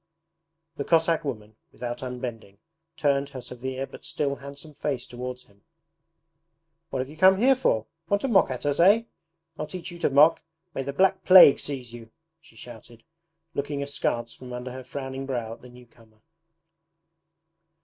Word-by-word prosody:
The 140 Hz, -, -2 dB
Cossack 165 Hz, +1 st, +2 dB
woman, 110 Hz, -6 st, -6 dB
without 120 Hz, -1 st, -6 dB
unbending, 120 Hz, -5 st, -6 dB, 0.4 s
turned 140 Hz, -2 st, +1 dB
her 135 Hz, -2 st, -8 dB
severe 130 Hz, +2 st, -5 dB
but -, -, -13 dB
still 140 Hz, -2 st, -2 dB
handsome 140 Hz, +2 st, -10 dB
face 140 Hz, -4 st, -3 dB
towards 125 Hz, +1 st, -7 dB
him. 100 Hz, 0 st, -27 dB, 1.3 s
'What 130 Hz, -, -2 dB
have -, -, -12 dB
you 150 Hz, -, -11 dB
come 190 Hz, +3 st, +6 dB
here 260 Hz, +6 st, +5 dB
for? 110 Hz, -, +1 dB, 0.2 s
Want 200 Hz, 0 st, +2 dB
to -, -, +1 dB
mock 205 Hz, -6 st, +4 dB
at 130 Hz, +2 st, -5 dB
us, 145 Hz, +1 st, 0 dB
eh? 205 Hz, +6 st, +6 dB, 0.6 s
I'll 150 Hz, -, -3 dB
teach 185 Hz, -1 st, -7 dB
you 170 Hz, -, -10 dB
to -, -, +2 dB
mock; 150 Hz, +4 st, +5 dB, 0.3 s
may -, -, -3 dB
the 135 Hz, +1 st, -4 dB
black 190 Hz, +5 st, +2 dB
plague 185 Hz, -6 st, +9 dB
seize 130 Hz, -5 st, -6 dB
you!' 115 Hz, -2 st, -10 dB, 0.3 s
she 160 Hz, -8 st, -21 dB
shouted, 115 Hz, 0 st, -13 dB, 0.5 s
looking 140 Hz, -1 st, -3 dB
askance 120 Hz, -4 st, -2 dB
from 125 Hz, -1 st, -10 dB
under 125 Hz, +1 st, -6 dB
her 130 Hz, +1 st, -8 dB
frowning 135 Hz, +1 st, -6 dB
brow 120 Hz, -4 st, -3 dB
at -, -, -14 dB
the 125 Hz, -, -13 dB
new 125 Hz, 0 st, -15 dB
comer. 110 Hz, -2 st, -24 dB
135 Hz, 170 wpm, -26 LUFS, 120-150 Hz, 1.3 s, plague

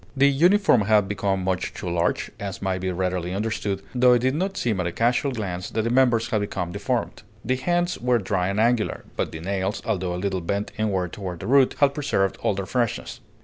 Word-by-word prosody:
The 140 Hz, +1 st, +6 dB
uniform 175 Hz, -, +4 dB
had 105 Hz, -2 st, +4 dB
become 95 Hz, -1 st, -1 dB
much 95 Hz, -1 st, -2 dB
too -, -, -6 dB
large, 85 Hz, 0 st, 0 dB
as 100 Hz, -2 st, -5 dB
may 95 Hz, -1 st, -1 dB
be 95 Hz, 0 st, -2 dB
readily 90 Hz, 0 st, -2 dB
understood, 100 Hz, -2 st, -2 dB
though 125 Hz, 0 st, +5 dB
it 120 Hz, 0 st, +2 dB
did 130 Hz, +1 st, +2 dB
not 190 Hz, +6 st, -2 dB
seem 110 Hz, -5 st, 0 dB
at 90 Hz, -, 0 dB
a -, -, -2 dB
casual 120 Hz, -, +1 dB
glance 90 Hz, -7 st, -4 dB
that 110 Hz, -, -1 dB
the 115 Hz, -, -1 dB
members 120 Hz, -3 st, +3 dB
had 110 Hz, -4 st, +1 dB
become 90 Hz, -4 st, -3 dB
deformed. 110 Hz, +5 st, -2 dB, 0.2 s
The 130 Hz, -, +1 dB
hands 175 Hz, +5 st, 0 dB
were 125 Hz, 0 st, +2 dB
dry 95 Hz, -3 st, -1 dB
and 100 Hz, +2 st, -1 dB
angular, 115 Hz, -1 st, +1 dB
but -, -, -2 dB
the 80 Hz, -, -7 dB
nails, 95 Hz, +2 st, -2 dB
although 90 Hz, -2 st, -1 dB
a -, -, -3 dB
little 95 Hz, 0 st, -2 dB
bent 100 Hz, +4 st, -2 dB
inward 95 Hz, -5 st, -1 dB
toward 90 Hz, -4 st, -6 dB
the -, -, -7 dB
root, 135 Hz, +3 st, +4 dB
had 140 Hz, -1 st, +3 dB
preserved 135 Hz, -10 st, 0 dB
all 100 Hz, -, +1 dB
their 100 Hz, 0 st, -3 dB
freshness. 120 Hz, +1 st, -2 dB
105 Hz, 220 wpm, -24 LUFS, 95-125 Hz, 0.2 s, The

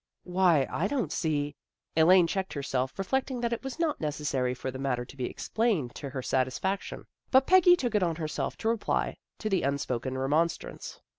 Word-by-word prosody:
" -, -, -59 dB
Why, 175 Hz, -6 st, +3 dB
I 185 Hz, -, 0 dB
don't 260 Hz, 0 st, -1 dB
see 145 Hz, -3 st, -1 dB, 0.2 s
" -, -, -52 dB
Elaine 175 Hz, +3 st, +6 dB
checked 190 Hz, +3 st, -2 dB
her 140 Hz, -, -4 dB
self, 130 Hz, -1 st, -2 dB
reflecting 255 Hz, +6 st, -1 dB
that 235 Hz, 0 st, 0 dB
it 235 Hz, -, -4 dB
was 270 Hz, +2 st, -5 dB
not 330 Hz, -3 st, -1 dB
necessary 145 Hz, -4 st, -1 dB
for 130 Hz, +1 st, -4 dB
the 130 Hz, -, -7 dB
matter 125 Hz, -3 st, -1 dB
to 130 Hz, -, -13 dB
be 130 Hz, -2 st, -3 dB
explained 205 Hz, -, -1 dB
to 140 Hz, -, -6 dB
her 130 Hz, -1 st, -5 dB
satisfaction. 130 Hz, +11 st, -1 dB, 0.2 s
But 260 Hz, 0 st, +5 dB
Peggy 360 Hz, -1 st, +7 dB
took 245 Hz, -9 st, -2 dB
it 210 Hz, -, +3 dB
on 170 Hz, -3 st, +1 dB
herself 155 Hz, -2 st, -3 dB
to 225 Hz, -, -1 dB
reply 230 Hz, -2 st, 0 dB, 0.2 s
to 215 Hz, -, -4 dB
the 195 Hz, -3 st, +1 dB
un 140 Hz, +1 st, +1 dB
spoken 130 Hz, 0 st, -3 dB
remonstrance. 150 Hz, +6 st, -1 dB
165 Hz, 205 wpm, -29 LUFS, 135-215 Hz, 0.2 s, Peggy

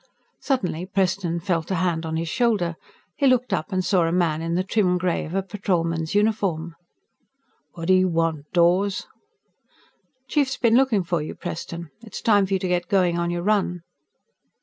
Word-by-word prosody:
Suddenly, 185 Hz, -, -1 dB
Preston 185 Hz, -3 st, 0 dB
felt 170 Hz, -2 st, -1 dB
a 190 Hz, -, 0 dB
hand 170 Hz, -2 st, 0 dB
on 160 Hz, 0 st, -2 dB
his 165 Hz, +1 st, -2 dB
shoulder. 205 Hz, -6 st, +1 dB, 0.4 s
He 280 Hz, -, +2 dB
looked 250 Hz, -4 st, +2 dB
up 175 Hz, +1 st, -2 dB
and 185 Hz, -1 st, 0 dB
saw 180 Hz, -4 st, +3 dB
a -, -, 0 dB
man 165 Hz, -3 st, +1 dB
in 165 Hz, +1 st, -2 dB
the 185 Hz, -, +1 dB
trim 190 Hz, -2 st, +1 dB
gray 180 Hz, -1 st, -1 dB
of 165 Hz, -, -6 dB
a 195 Hz, -, +1 dB
Patrolman's 170 Hz, -4 st, -1 dB
uniform. 195 Hz, -6 st, 0 dB, 1.0 s
"What 165 Hz, +1 st, -6 dB
do -, -, +7 dB
you 185 Hz, 0 st, +4 dB
want, 165 Hz, -3 st, -1 dB
Dawes?" 185 Hz, +3 st, +2 dB, 1.2 s
"Chief's 275 Hz, -1 st, 0 dB
been 230 Hz, -3 st, +2 dB
looking 245 Hz, -7 st, +3 dB
for 170 Hz, -2 st, -1 dB
you, 150 Hz, -, -6 dB
Preston. 170 Hz, 0 st, -6 dB
It's 220 Hz, -4 st, -8 dB
time 205 Hz, -3 st, +3 dB
for 195 Hz, -, -2 dB
you 190 Hz, -, +2 dB
to 185 Hz, -, -1 dB
get 175 Hz, -1 st, 0 dB
going 180 Hz, -3 st, +2 dB
on 170 Hz, 0 st, 0 dB
your 175 Hz, 0 st, -2 dB
run." 185 Hz, -4 st, 0 dB
180 Hz, 180 wpm, -23 LUFS, 170-200 Hz, 1.2 s, do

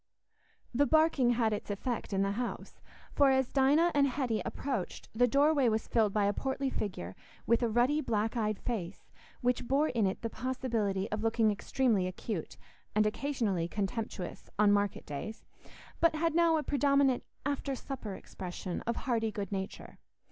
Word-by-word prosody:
The 285 Hz, +4 st, +3 dB
barking 310 Hz, -6 st, +4 dB
had 225 Hz, -2 st, +1 dB
its 210 Hz, -, -5 dB
effect 220 Hz, +4 st, -3 dB
in 195 Hz, 0 st, +1 dB
the 195 Hz, -, 0 dB
house, 240 Hz, +4 st, -5 dB, 0.3 s
for, 280 Hz, -1 st, +5 dB
as 265 Hz, -1 st, +2 dB
Dinah 290 Hz, +6 st, +4 dB
and 280 Hz, -1 st, +4 dB
Hetty 250 Hz, -4 st, -1 dB
approached, 255 Hz, -10 st, -4 dB
the 245 Hz, +3 st, +4 dB
doorway 280 Hz, 0 st, +4 dB
was 220 Hz, 0 st, -1 dB
filled 220 Hz, -3 st, +2 dB
by 205 Hz, 0 st, +2 dB
a 200 Hz, -, +2 dB
portly 265 Hz, +3 st, -2 dB
figure, 95 Hz, -, -4 dB, 0.3 s
with 235 Hz, +1 st, +3 dB
a 235 Hz, -, +2 dB
ruddy 245 Hz, +7 st, +2 dB
black 225 Hz, -4 st, -1 dB
eyed 215 Hz, -3 st, 0 dB
face 200 Hz, -7 st, -5 dB, 0.3 s
which 245 Hz, -1 st, 0 dB
bore 285 Hz, +3 st, +2 dB
in 225 Hz, -5 st, +1 dB
it 190 Hz, -, -4 dB
the 230 Hz, -, -1 dB
possibility 225 Hz, -6 st, -1 dB
of 215 Hz, 0 st, -2 dB
looking 225 Hz, -1 st, +2 dB
extremely 210 Hz, -2 st, +1 dB
acute, 185 Hz, 0 st, -5 dB, 0.4 s
and 215 Hz, 0 st, +4 dB
occasionally 215 Hz, -7 st, -1 dB
contemptuous, 205 Hz, 0 st, -4 dB
on 205 Hz, 0 st, +5 dB
market 205 Hz, -1 st, +1 dB
days, 150 Hz, +10 st, -6 dB, 0.5 s
but 335 Hz, -2 st, +4 dB
had 330 Hz, +1 st, +1 dB
now 335 Hz, -1 st, +4 dB
a 305 Hz, -, -1 dB
predominant 280 Hz, -2 st, +2 dB, 0.2 s
after 280 Hz, -1 st, -1 dB
supper 245 Hz, -7 st, -6 dB
expression 180 Hz, -1 st, -6 dB
of 235 Hz, -, +1 dB
hearty 225 Hz, -4 st, -1 dB
good 205 Hz, -2 st, -5 dB
nature. 190 Hz, -1 st, -5 dB
235 Hz, 165 wpm, -31 LUFS, 205-270 Hz, 0.5 s, for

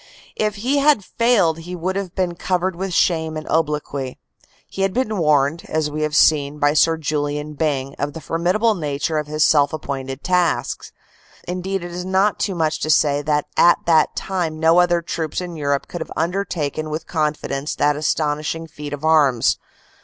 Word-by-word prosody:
If 215 Hz, -1 st, -1 dB
he 255 Hz, +7 st, 0 dB
had 280 Hz, -7 st, +4 dB
failed 200 Hz, -9 st, +2 dB
he 175 Hz, +2 st, -7 dB
would 180 Hz, +2 st, -2 dB
have 195 Hz, -3 st, -4 dB
been 185 Hz, -2 st, 0 dB
covered 180 Hz, +1 st, -1 dB
with 190 Hz, +2 st, -4 dB
shame 160 Hz, -2 st, +1 dB
and 155 Hz, -, -7 dB
obloquy. 150 Hz, -4 st, -1 dB, 0.5 s
He 195 Hz, -, -6 dB
had 195 Hz, -1 st, +1 dB
been 220 Hz, -5 st, 0 dB
warned, 150 Hz, 0 st, +2 dB
as 155 Hz, -1 st, -1 dB
we 155 Hz, +1 st, -3 dB
have 155 Hz, 0 st, -1 dB
seen, 145 Hz, -1 st, +3 dB
by 145 Hz, 0 st, +2 dB
Sir 165 Hz, +2 st, +3 dB
Julian 150 Hz, -1 st, -2 dB
Byng 140 Hz, -3 st, -1 dB
of 145 Hz, 0 st, -2 dB
the 165 Hz, -, -7 dB
formidable 180 Hz, +8 st, +1 dB
nature 155 Hz, -2 st, -2 dB
of 150 Hz, -, -5 dB
his 155 Hz, 0 st, +1 dB
self 145 Hz, -1 st, +3 dB
appointed 135 Hz, -3 st, -5 dB
task; 180 Hz, -2 st, 0 dB, 0.6 s
indeed 185 Hz, +1 st, -3 dB
it 175 Hz, -, -7 dB
is 180 Hz, +1 st, -5 dB
not 190 Hz, +2 st, +1 dB
too 195 Hz, -, -1 dB
much 160 Hz, -2 st, 0 dB
to 155 Hz, -, -3 dB
say 145 Hz, -2 st, +3 dB
that 150 Hz, 0 st, 0 dB
at 175 Hz, -, +6 dB
that 160 Hz, -2 st, +3 dB
time 170 Hz, -5 st, -2 dB
no 165 Hz, +2 st, +5 dB
other 175 Hz, -1 st, +3 dB
troops 160 Hz, -1 st, -3 dB
in 180 Hz, -2 st, -6 dB
Europe 140 Hz, -2 st, -1 dB
could 175 Hz, -, -6 dB
have -, -, -6 dB
undertaken 160 Hz, -4 st, -2 dB
with 155 Hz, +1 st, -4 dB
confidence 150 Hz, -3 st, -2 dB
that 145 Hz, 0 st, +2 dB
aston 150 Hz, 0 st, 0 dB
ishing 165 Hz, +2 st, -4 dB
feat 150 Hz, -2 st, -8 dB
of 145 Hz, +2 st, -5 dB
arms. 145 Hz, -7 st, +3 dB
160 Hz, 185 wpm, -20 LUFS, 150-180 Hz, 0.6 s, at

